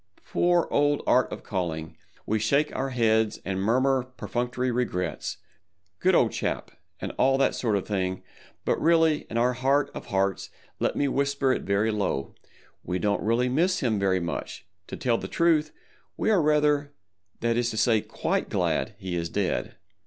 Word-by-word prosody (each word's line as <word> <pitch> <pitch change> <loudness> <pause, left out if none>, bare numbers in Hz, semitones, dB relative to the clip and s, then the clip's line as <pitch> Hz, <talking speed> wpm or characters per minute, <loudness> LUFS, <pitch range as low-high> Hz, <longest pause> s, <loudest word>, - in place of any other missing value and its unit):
Poor 175 -1 +2
old 145 0 +2
Art 125 0 +3
of - - -7
Calling! 80 -5 -3 0.3
We 110 +1 0
shake 140 +8 +1
our 135 +1 -1
heads 110 -3 +2
and 95 0 -2
murmur 130 +5 +2
perfunctory 125 0 -3
regrets—"good 90 - -3
old 115 - +4
chap," - - -3 0.3
and - - -4
all 135 +1 +4
that 135 - +2
sort 110 -4 0
of 100 - -2
thing, 95 -2 -2 0.4
but - - 0
really 160 -2 +3
in 115 - -3
our 125 +2 +3
heart 135 +3 +1
of - - -8
hearts, 95 -1 0 0.3
let - - 0
me 145 - +1
whisper 140 0 +1
it - - -2
very 100 +3 +1
low—we 90 -1 -5
don't 100 +2 0
really 115 +4 +1
miss 170 +9 +1
him 110 -5 +1
very 95 -1 +2
much; 85 -1 -5 0.2
to - - -6
tell 120 -2 +1
the - - -5
truth, 160 -3 +2 0.5
we 220 - +1
are 195 -5 +4
rather, 150 -1 +2 0.5
that 115 0 +1
is 120 0 +1
to 110 - -5
say, 110 -1 +3
quite - - -2
glad 110 - 0
he 95 -3 -4
is 85 -1 -2
dead. 100 0 -2
120 Hz, 165 wpm, -26 LUFS, 100-140 Hz, 0.5 s, old